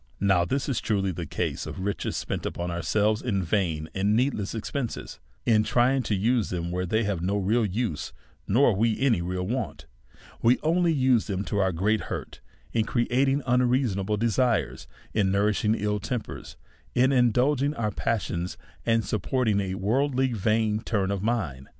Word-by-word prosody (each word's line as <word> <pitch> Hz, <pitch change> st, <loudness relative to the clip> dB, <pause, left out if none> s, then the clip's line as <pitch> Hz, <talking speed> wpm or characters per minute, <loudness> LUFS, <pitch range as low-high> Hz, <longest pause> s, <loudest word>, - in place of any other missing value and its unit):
Now, 95 Hz, -3 st, +3 dB
this 135 Hz, +7 st, -1 dB
is 135 Hz, -, -1 dB
truly 100 Hz, -4 st, 0 dB
the 85 Hz, -2 st, -5 dB
case -, -, -3 dB
of -, -, -6 dB
riciies 100 Hz, +2 st, -3 dB
spent -, -, -3 dB
upon 85 Hz, 0 st, -3 dB
our 85 Hz, 0 st, -3 dB
selves 105 Hz, +5 st, +1 dB
in 100 Hz, -6 st, -1 dB
vain 80 Hz, -4 st, 0 dB
and 100 Hz, +2 st, +1 dB
needless 115 Hz, -4 st, 0 dB
expenses; 120 Hz, +2 st, -4 dB, 0.3 s
in 110 Hz, -2 st, +4 dB
trying 125 Hz, +4 st, +2 dB
to 110 Hz, -3 st, -1 dB
use 115 Hz, +3 st, +1 dB
them 85 Hz, -1 st, -3 dB
where 90 Hz, +1 st, -2 dB
they 110 Hz, +5 st, +1 dB
have 100 Hz, -5 st, -1 dB
no 100 Hz, +3 st, 0 dB
real 105 Hz, +5 st, +2 dB
use, 105 Hz, -4 st, -2 dB, 0.4 s
nor 120 Hz, 0 st, +4 dB
we 110 Hz, +2 st, +1 dB
any 125 Hz, -9 st, +2 dB
real 90 Hz, +1 st, -2 dB
want, 125 Hz, +6 st, -3 dB, 0.6 s
we 120 Hz, +2 st, +4 dB
only 170 Hz, +2 st, +3 dB
use 130 Hz, -6 st, +2 dB
them 100 Hz, -1 st, -2 dB
to 105 Hz, -, -1 dB
our 95 Hz, -1 st, +2 dB
great 105 Hz, +6 st, +1 dB
hurt, -, -, -6 dB, 0.3 s
in 115 Hz, -, +2 dB
creating 130 Hz, +4 st, +1 dB
unreasonable 120 Hz, -5 st, +1 dB
desires, 110 Hz, -, 0 dB, 0.3 s
in 100 Hz, -3 st, +2 dB
nourishing 105 Hz, +2 st, +2 dB
ill 105 Hz, -1 st, -1 dB
tempers, 115 Hz, +3 st, -5 dB, 0.4 s
in 130 Hz, +2 st, +4 dB
in 125 Hz, -3 st, +4 dB
dulging 140 Hz, +4 st, +1 dB
our 110 Hz, -4 st, -1 dB
passions, 90 Hz, -5 st, -2 dB, 0.3 s
and 115 Hz, -1 st, +2 dB
supporting 110 Hz, -1 st, 0 dB
a 95 Hz, -1 st, -2 dB
worldly 130 Hz, +6 st, +1 dB
vain 110 Hz, 0 st, +1 dB
turn 100 Hz, -4 st, -1 dB
of 100 Hz, -2 st, -2 dB
mind. 90 Hz, -, -2 dB
110 Hz, 170 wpm, -26 LUFS, 95-125 Hz, 0.6 s, in